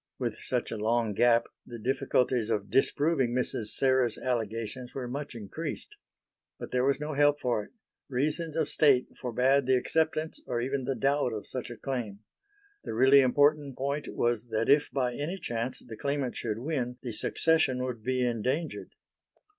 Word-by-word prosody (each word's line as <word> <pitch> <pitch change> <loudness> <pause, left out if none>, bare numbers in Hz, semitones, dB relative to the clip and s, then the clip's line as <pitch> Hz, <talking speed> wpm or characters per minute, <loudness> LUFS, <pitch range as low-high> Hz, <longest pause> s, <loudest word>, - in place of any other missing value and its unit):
With - - -2
such - - -2
a 115 - -3
long 115 0 +1
gap 115 +2 +4 0.2
the 120 - -9
difficulties 125 -1 +1
of 105 -3 -1
disproving 135 -2 +2
Mrs. 125 -3 -1
Serres' 130 -1 +2
allegations 115 0 -3
were 130 -2 -3
much 140 +1 -5
increased. 145 - -6 0.7
But - - -8
there 125 0 +1
was 140 +2 +2
no 150 +1 -3
help 145 +1 +3
for 120 -4 0
it; - - -21 0.4
reasons 150 +5 -1
of 160 -3 +1
State 140 -5 +3
forbade 130 +2 +1
the 130 - +5
acceptance 160 +3 -1
or 120 - -1
even 130 +2 -2
the 135 0 -1
doubt 140 -3 +1
of 105 - -5
such 130 -2 -5
a 120 - -8
claim. 115 -7 -4 0.6
The - - -5
really 135 +4 +7
important 145 +1 +3
point 140 +2 -2
was 120 -1 0
that 110 0 0
if 145 +1 +5
by 125 -3 -1
any 155 +9 -3
chance 120 -6 -3
the 115 -2 -8
claimant 140 +1 -2
should 110 -2 -3
win, 125 -2 -2
the 125 - -4
Succession 135 +1 +1
would 125 -3 -4
be 130 0 +1
endangered. 125 +7 -2
130 Hz, 170 wpm, -29 LUFS, 120-140 Hz, 0.7 s, really